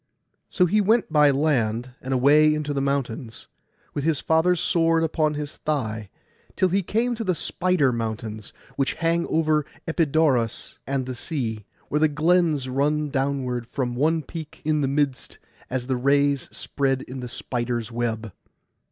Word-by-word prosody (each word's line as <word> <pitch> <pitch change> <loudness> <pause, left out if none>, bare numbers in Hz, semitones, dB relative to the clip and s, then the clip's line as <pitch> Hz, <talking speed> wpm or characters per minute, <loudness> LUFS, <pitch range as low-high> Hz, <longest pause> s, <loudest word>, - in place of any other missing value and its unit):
So 180 - +3
he 210 +5 +3
went 210 -4 +2
by 150 -1 +6
land, 130 -5 +1
and 130 - -5
away 150 +4 +5
into 150 -1 -2
the 140 - -1
mountains, 130 -4 -3 0.5
with 145 - -3
his 155 -2 +1
father's 165 +2 +2
sword 165 -2 +2
upon 155 -1 +1
his 150 0 -5
thigh, 110 -9 -2 0.5
till 185 -1 +2
he 195 +3 +2
came 230 +6 0
to 230 -1 -4
the 185 -4 0
Spider 170 -3 +1
mountains, 110 -2 -4 0.3
which 135 - 0
hang 170 0 0
over 155 -1 +2 0.2
Epidaurus 155 -8 +1
and 135 -1 -1
the 130 - -4
sea, 120 - -4 0.2
where 150 - +1
the 155 - +5
glens 155 -2 +2
run 145 +3 0
downward 135 -4 -1
from 125 -2 -2
one 155 +4 +1
peak 155 +1 -9
in 155 -1 +2
the 135 - +1
midst, 140 -1 -1 0.3
as 125 0 -2
the 130 0 -1
rays 140 +1 +2
spread 135 -2 -1
in 130 +1 -8
the 125 - -5
spider's 120 -1 -3
web. 115 -3 -3
140 Hz, 160 wpm, -24 LUFS, 125-160 Hz, 0.5 s, by